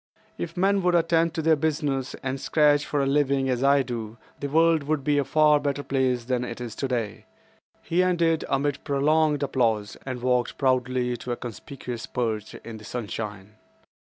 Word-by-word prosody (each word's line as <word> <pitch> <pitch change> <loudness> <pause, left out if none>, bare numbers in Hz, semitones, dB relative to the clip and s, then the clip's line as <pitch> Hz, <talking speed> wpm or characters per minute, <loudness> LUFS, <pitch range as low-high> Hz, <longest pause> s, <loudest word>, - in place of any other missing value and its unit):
"If 85 - -6
men 195 +2 +3
would 180 -1 +2
attend 165 0 +2
to 160 - -2
their 160 0 +5
business 145 -3 -1
and 135 0 -3
scratch 150 -1 +3
for 145 -2 0
a - - +1
living 140 -1 +2
as 125 0 0
I 140 0 +4
do, 115 -3 -6 0.2
the 140 - -3
world 165 +1 +4
would 145 0 -1
be 145 +1 +2
a - - +2
far 150 0 +4
better 145 0 -2
place 130 -3 0
than 125 0 -1
it 120 -1 -6
is 120 -3 -5
today." 120 -4 -3 0.6
He 175 +2 +1
ended 170 -3 +2
amid 140 +1 0
prolonged 150 +1 +2
applause, 115 -6 0
and 130 -2 -5
walked 125 -1 +1
proudly 125 -2 +1
to 125 - -4
a - - -5
conspicuous 120 0 -7
perch 110 -4 -3
in 115 -1 -9
the 110 - -13
sunshine. 105 -2 -6
135 Hz, 180 wpm, -25 LUFS, 120-150 Hz, 0.6 s, their